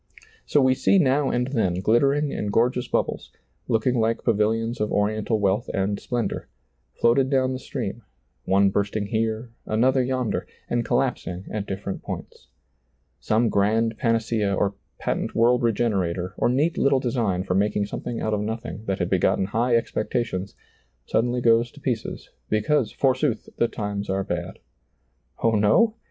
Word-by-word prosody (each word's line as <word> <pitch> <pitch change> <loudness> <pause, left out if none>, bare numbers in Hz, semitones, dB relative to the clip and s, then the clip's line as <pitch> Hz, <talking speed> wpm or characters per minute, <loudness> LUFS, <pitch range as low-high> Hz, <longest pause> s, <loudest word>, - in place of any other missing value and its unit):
So 145 - +3
we 130 -1 +4
see 135 +9 +3
now 140 -4 +3
and 125 +1 0
then 110 -10 +1
glittering 135 +9 +2
and 105 - -2
gor 120 +4 +3
geous 125 -1 -5
bubbles, - - -1 0.4
looking 115 +3 +2
like 115 +1 0
pavilions 115 +1 +1
of 105 - 0
oriental 110 +2 0
wealth 100 +2 +1
and 100 +1 0
splendor, 120 -2 -3 0.5
floated 130 +3 +3
down 130 -1 +2
the 130 - -4
stream, - - -5 0.4
one 100 +1 +3
bursting 100 +1 -1
here, 110 +2 -2 0.2
another 130 +5 +3
yonder, 125 -2 -1 0.2
and 120 0 0
collaps 125 +2 0
ing 90 +1 -5
at 105 -1 -3
different 95 0 -4
points. - - -8 0.7
Some 115 +2 +2
grand 110 +3 +2
panacea 115 -4 +1
or 100 +1 0 0.2
patent - - -2
world 120 +2 +4
regenerator, 95 -6 0
or - - +1
neat 145 +7 +1
little 140 -1 +3
design 115 -8 0
for 95 - -1
making 100 +1 +1
something 115 +3 -5
out 110 - -1
of 105 - 0
nothing 110 0 -5
that 95 -2 -1
had - - -1
begotten - - +2
high 115 +5 +1
expectations, 110 -4 -2 0.5
suddenly 120 - 0
goes 115 0 +4
to 145 - -16
pieces, 125 -6 -4 0.2
because 110 +4 +1
forsooth 130 -3 0
the 120 - +3
times 100 -2 -4
are 95 0 0
bad. 90 0 -4 0.9
Oh, 115 - +4
no 110 - +3
115 Hz, 155 wpm, -24 LUFS, 100-125 Hz, 0.9 s, we